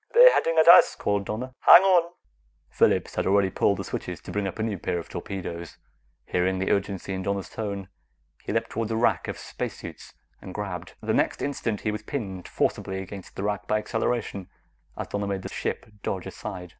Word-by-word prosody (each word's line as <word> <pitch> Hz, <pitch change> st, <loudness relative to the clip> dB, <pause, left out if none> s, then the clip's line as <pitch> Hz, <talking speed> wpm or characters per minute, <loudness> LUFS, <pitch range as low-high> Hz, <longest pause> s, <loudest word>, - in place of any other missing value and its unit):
"They're -, -, +9 dB
heading 165 Hz, 0 st, +1 dB
at 160 Hz, -, +5 dB
us!" 170 Hz, -, +9 dB
called 100 Hz, -1 st, -1 dB
Donna. 125 Hz, +6 st, -4 dB
"Hang 175 Hz, -, +9 dB
on!" 175 Hz, -3 st, +4 dB, 0.6 s
Phillips -, -, +2 dB
had -, -, -1 dB
already 95 Hz, 0 st, +3 dB
pulled 100 Hz, -, +2 dB
the 100 Hz, -, -4 dB
switches -, -, -5 dB
to -, -, -9 dB
bring 105 Hz, -1 st, -1 dB
up 95 Hz, -, -6 dB
a 110 Hz, -, -1 dB
new 105 Hz, -4 st, -2 dB
pair 90 Hz, -, -2 dB
of 85 Hz, -, -6 dB
torpedoes. 85 Hz, -3 st, -6 dB, 0.5 s
Hearing 95 Hz, +1 st, 0 dB
the 95 Hz, -, 0 dB
urgency 100 Hz, -1 st, -1 dB
in 95 Hz, -, -3 dB
Donna's 100 Hz, 0 st, -2 dB
tone, 100 Hz, -3 st, -4 dB, 0.6 s
he -, -, -4 dB
leaped 115 Hz, +1 st, -1 dB
toward 115 Hz, -1 st, -2 dB
a 115 Hz, -, -1 dB
rack 110 Hz, -6 st, +2 dB
of -, -, -4 dB
spacesuits -, -, -7 dB, 0.3 s
and 95 Hz, -, -9 dB
grabbed. 90 Hz, -4 st, -5 dB
The -, -, -1 dB
next -, -, +1 dB
instant, 115 Hz, -7 st, -2 dB
he 105 Hz, -, 0 dB
was 105 Hz, 0 st, -4 dB
pinned 100 Hz, -6 st, -5 dB
forcibly 95 Hz, 0 st, -1 dB
against 95 Hz, 0 st, -9 dB
the 95 Hz, -, -4 dB
rack 105 Hz, 0 st, -2 dB
by 110 Hz, -, +2 dB
acceleration, 105 Hz, -3 st, -2 dB, 0.5 s
as -, -, -3 dB
Donna 100 Hz, 0 st, -3 dB
made 95 Hz, -1 st, -3 dB
the -, -, -5 dB
ship -, -, -3 dB, 0.2 s
dodge 95 Hz, -1 st, -3 dB
aside. 90 Hz, -1 st, -7 dB
100 Hz, 200 wpm, -26 LUFS, 95-110 Hz, 0.6 s, They're